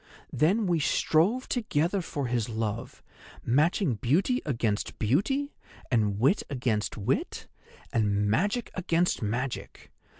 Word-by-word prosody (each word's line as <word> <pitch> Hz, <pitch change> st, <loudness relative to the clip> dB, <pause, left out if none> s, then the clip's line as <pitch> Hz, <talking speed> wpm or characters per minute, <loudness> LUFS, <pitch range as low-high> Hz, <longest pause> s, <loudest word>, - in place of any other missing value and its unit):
Then 195 Hz, +8 st, +2 dB
we 175 Hz, -3 st, +1 dB
strove 180 Hz, -, +2 dB
together 195 Hz, -, 0 dB
for 145 Hz, -4 st, -4 dB
his 120 Hz, -2 st, -1 dB
love, 110 Hz, 0 st, -4 dB, 0.4 s
matching 150 Hz, -, +2 dB
beauty 160 Hz, -, +1 dB
against 115 Hz, -6 st, -1 dB
beauty, 220 Hz, -, 0 dB, 0.4 s
and 105 Hz, -4 st, +1 dB
wit 140 Hz, -, +3 dB
against 120 Hz, -7 st, -1 dB
wit, 100 Hz, -, -2 dB, 0.5 s
and 105 Hz, -2 st, +1 dB
magic 205 Hz, -, 0 dB
against 175 Hz, -1 st, 0 dB
magic. 120 Hz, +4 st, -4 dB
140 Hz, 110 wpm, -28 LUFS, 115-185 Hz, 0.5 s, wit